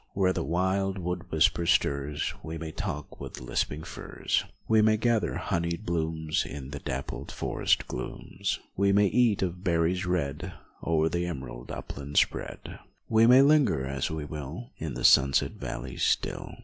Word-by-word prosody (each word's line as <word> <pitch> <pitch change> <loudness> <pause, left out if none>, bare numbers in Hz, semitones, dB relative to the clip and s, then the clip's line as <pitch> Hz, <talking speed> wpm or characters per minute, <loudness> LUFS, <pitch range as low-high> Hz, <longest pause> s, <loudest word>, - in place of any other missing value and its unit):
Where 95 -1 +3
the - - -2
wild 95 +3 0
wood 90 -1 -4
whisper 85 +2 +3
stirs 70 -4 +1
We 80 +1 -6
may 80 -1 -5
talk 75 -1 -5
with - - -7
lisping 65 +5 -2
firs, - - -2 0.2
We 110 -1 +5
may 110 0 +4
gather 110 -5 +1
honeyed 85 +4 -2
bloomS 80 -2 0
In 70 -1 -7
the 75 - -5
dappled 70 -1 -5
forest - - 0
glooms, - - -4 0.2
We 100 +1 +3
may 100 +1 +5
eat 110 -1 +3
of 90 0 -3
berries 90 +1 +1
red 85 -6 -2 0.3
O'er 80 -1 +2
the 85 +2 -1
emerald 60 -7 -6
upland 70 +1 -6
spread. - - 0 0.3
We 110 +1 +5
may 130 +2 +8
linger 140 - +4
as 70 -1 -2
we 80 -2 -4
will 75 - -7
In 75 -5 -4
the - - -2
sunset 70 0 +5
valleys - - -6
still. - - 0
85 Hz, 160 wpm, -28 LUFS, 75-95 Hz, 0.3 s, may